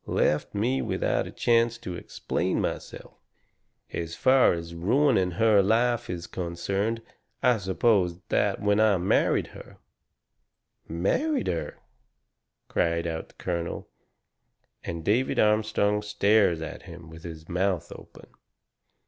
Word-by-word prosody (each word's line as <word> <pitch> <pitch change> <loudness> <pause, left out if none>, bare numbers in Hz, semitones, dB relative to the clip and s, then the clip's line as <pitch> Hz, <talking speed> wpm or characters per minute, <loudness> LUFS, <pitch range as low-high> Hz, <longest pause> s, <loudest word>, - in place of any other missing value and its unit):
Left 75 +6 0
me 120 +6 +1
without - - -1
a - - -8
chance 115 -1 +2
to 105 -6 -7
explain 90 +1 -2
myself. - - -5 0.8
As 85 0 -4
far 130 -4 +4
as 85 0 -6
ruining 100 - +2
her 110 -3 +5
life 115 +4 +1
is 90 -1 -4
concerned, 100 +7 -3 0.4
I 125 -3 +4
suppose 95 -1 +1
that - - +1
when 105 0 +2
I 110 -3 +4
married 90 +2 +2
her - - -12 0.6
" - - -54
"Married 255 - 0
her!" 85 - -3 0.9
cries 85 0 0
out 80 -1 -4
the - - -23
colonel. 85 -1 -4 0.9
And 85 -1 -5
David 120 +6 +1
Armstrong 105 -1 +2
stares 105 -4 +2
at 80 - -7
him 85 -1 -11
with 80 0 -11
his 80 -1 -9
mouth 90 -1 -1
open. - - -12
100 Hz, 125 wpm, -26 LUFS, 85-110 Hz, 0.9 s, her